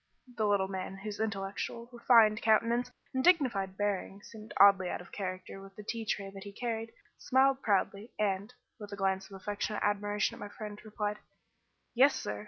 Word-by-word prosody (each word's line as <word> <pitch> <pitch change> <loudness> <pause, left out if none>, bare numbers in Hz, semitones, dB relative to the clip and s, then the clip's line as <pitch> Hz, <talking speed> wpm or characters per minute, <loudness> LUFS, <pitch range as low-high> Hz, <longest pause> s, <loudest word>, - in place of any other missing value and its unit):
The 215 -2 +1
little 200 -2 +2
man, 190 0 -5
whose 205 +1 -6
intellectual, 215 +2 -3
refined 230 -2 +5
countenance 230 +2 +2 0.2
and 260 0 0
dignified 230 - +3
bearing 200 -1 -2
seemed 220 -1 -12
oddly 195 -2 +6
out - - -3
of 180 - -13
character 185 0 -5
with 195 0 -13
the 210 - -9
tea 225 +1 -4
tray 200 -2 -2
that 195 -1 -9
he 200 - -8
carried, 225 +1 -4 0.3
smiled 265 +1 +3
proudly, 200 +1 0
and, 200 +1 -1 0.3
with 205 -1 -9
a - - -4
glance 195 0 0
of - - -14
affectionate 205 +2 -3
admiration 205 0 0
at - - -11
my 205 - -6
friend, 210 0 -8
replied 210 -1 -3 0.7
"Yes, 270 +4 +5
sir. 100 0 -4
205 Hz, 180 wpm, -31 LUFS, 195-225 Hz, 0.7 s, oddly